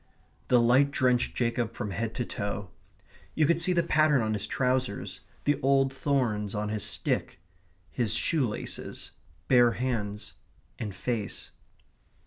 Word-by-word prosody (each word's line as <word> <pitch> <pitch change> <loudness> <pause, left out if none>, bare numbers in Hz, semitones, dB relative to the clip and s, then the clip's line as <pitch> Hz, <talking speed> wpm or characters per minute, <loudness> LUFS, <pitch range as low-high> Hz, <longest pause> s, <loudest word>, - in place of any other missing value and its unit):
The 125 - +5
light 125 +4 +4
drenched 125 -3 +1
Jacob 115 -1 -1
from 105 -4 -4
head 115 +2 -3
to 120 - -2
toe. 100 -2 -4 0.6
You 155 - +3
could 170 +2 +2
see 180 - +2
the 170 -1 +2
pattern 155 -5 +3
on 110 0 0
his 105 -1 -1
trousers; 125 -7 -1 0.2
the 145 0 +1
old 135 0 +3
thorns 120 -7 0
on 105 0 -2
his 105 -2 -2
stick; - - 0 0.5
his 110 -3 0
shoe 150 -2 +2
laces; 105 - -6 0.4
bare 120 -2 +5
hands; 110 -5 -3 0.5
and 105 -4 -5
face. 110 +1 -3
120 Hz, 140 wpm, -28 LUFS, 105-135 Hz, 0.6 s, The